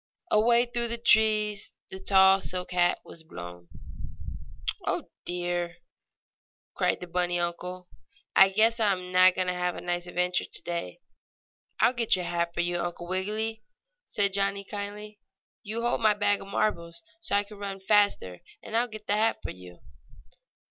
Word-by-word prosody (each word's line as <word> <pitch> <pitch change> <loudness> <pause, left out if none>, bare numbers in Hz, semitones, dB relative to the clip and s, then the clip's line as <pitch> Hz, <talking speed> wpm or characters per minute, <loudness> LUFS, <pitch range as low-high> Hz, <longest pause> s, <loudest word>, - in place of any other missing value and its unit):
Away 235 +3 +4
through 240 0 -2
the 235 0 -1
trees 215 -2 +3 0.2
the 190 - -5
tall 190 0 +5
silk 180 -1 -2
hat 175 0 +3
was 165 - -11
blown. 90 - -10 1.2
"Oh, - - -2
dear!" 175 -1 -2 1.0
cried - - 0
the - - -4
bunny 175 0 0
uncle. 180 +1 -4 0.5
"I 195 - +8
guess 225 +4 +3
I 210 -3 +3
am 180 -1 -6
not 185 0 +6
going 185 - 0
to 180 - 0
have 180 0 -1
a - - -6
nice 175 0 -3
adventure 180 +1 0
today." 170 - -4 0.8
"I'll 245 - +4
get 235 -3 +2
your 180 -1 -3
hat 170 0 -1
for - - +1
you, 175 0 -1
Uncle 175 0 -4
Wiggily!" 215 +4 -2 0.5
said 200 -2 +1
Johnnie 200 0 0
kindly. 210 +1 -7 0.4
"You 220 +2 -4
hold 240 0 0
my 215 -2 +4
bag 205 -1 +1
of - - -10
marbles 170 -5 -2 0.2
so 330 -8 -1
I 205 - +3
can 205 0 -13
run 200 -1 -5
faster, 195 - +2 0.2
and 220 - -6
I'll 240 +2 +3
get 215 -2 -10
the - - 0
hat 220 +2 +2
for - - -4
you." 90 -1 -13
190 Hz, 165 wpm, -28 LUFS, 175-210 Hz, 1.2 s, I